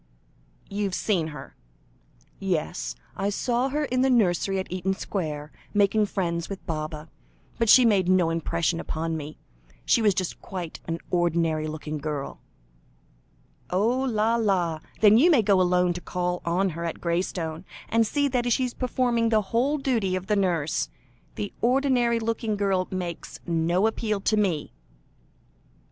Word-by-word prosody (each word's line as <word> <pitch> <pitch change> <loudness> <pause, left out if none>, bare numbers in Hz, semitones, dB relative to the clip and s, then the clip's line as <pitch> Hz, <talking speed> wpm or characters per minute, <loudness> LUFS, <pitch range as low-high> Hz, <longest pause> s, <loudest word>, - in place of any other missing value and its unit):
"You've 200 -2 -2
seen 180 -7 0
her?" 150 -3 -9 0.8
"Yes; 160 - -2 0.2
I 195 +1 -1
saw 240 +5 0
her 295 +2 -1
in 255 -2 0
the 265 - +3
nursery 195 -5 +2
at 190 - -4
Eaton 185 +1 -1
Square, 155 -7 -4 0.2
making 205 +1 +3
friends 170 -4 -2
with 195 -1 -7
Baba, 155 -2 -4 0.5
but 230 -2 +2
she 255 +2 +8
made 195 -5 +3
no 180 -3 +4
impression 165 0 0
upon 165 0 -3
me; 155 0 -6 0.5
she 235 - +4
was 205 -3 +3
just 185 -2 -3
quite 180 -4 -6
an 165 0 -1
ordinary 165 -3 +1
looking 155 0 -5
girl." 145 -1 -5 1.3
"Oh! 220 +8 +1
la, 230 -3 +1
la! 180 -8 +1 0.2
then 215 +1 +7
you 330 +7 +6
may 280 -10 +5
go 195 -2 +4
alone 180 0 +3
to 180 - -6
call 180 0 -2
on 180 +3 +1
her 170 0 -5
at 170 - -4
Graystone, 170 -1 -2 0.2
and 230 -1 +2
see 285 +5 +1
that 245 -2 0
she 260 - +2
is 245 - -4
performing 245 -2 +1
the 220 -1 +3
whole 270 +6 +2
duty 230 -9 0
of 185 0 -4
the 210 - +1
nurse. 170 -6 0 0.5
The 205 - -4
ordinary 245 -2 +2
looking 225 -1 -1
girl 195 -2 +1
makes 180 -3 -5
no 170 +3 +1
appeal 220 -2 0
to 215 - +2
me." 185 -8 0
190 Hz, 155 wpm, -26 LUFS, 170-225 Hz, 1.3 s, she